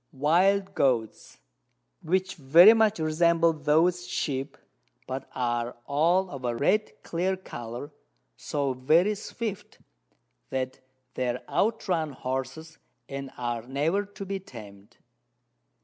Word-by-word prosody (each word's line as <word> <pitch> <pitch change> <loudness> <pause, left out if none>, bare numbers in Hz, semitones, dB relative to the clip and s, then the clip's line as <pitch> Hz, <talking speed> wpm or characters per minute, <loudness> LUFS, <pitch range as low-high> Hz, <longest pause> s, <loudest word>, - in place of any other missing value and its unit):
Wild 190 +8 +2
Goats, 120 - 0 0.6
which 185 +2 0
very 170 +8 +7
much 220 -2 +3
resemble 165 +1 +3
those 160 +4 +2
Sheep, 135 -1 -3 0.5
but 130 +1 -6
are 120 -1 -2
all 175 +6 +2
of 135 -2 -8
a 120 -1 -1
red 210 - 0
clear 185 +3 -1
Colour, 120 -5 -8 0.4
so 140 -2 -2
very 155 +11 +3
swift 210 0 -6 0.7
that 130 0 -3 0.3
they 125 -1 -1
out 220 +1 0
run 160 -5 0
Horses, 135 +5 -5 0.3
and 135 -1 -6
are 120 -1 -2
never 155 +9 0
to 200 0 -9
be 195 0 -3
tamed. 105 - -13
155 Hz, 115 wpm, -27 LUFS, 130-185 Hz, 0.7 s, very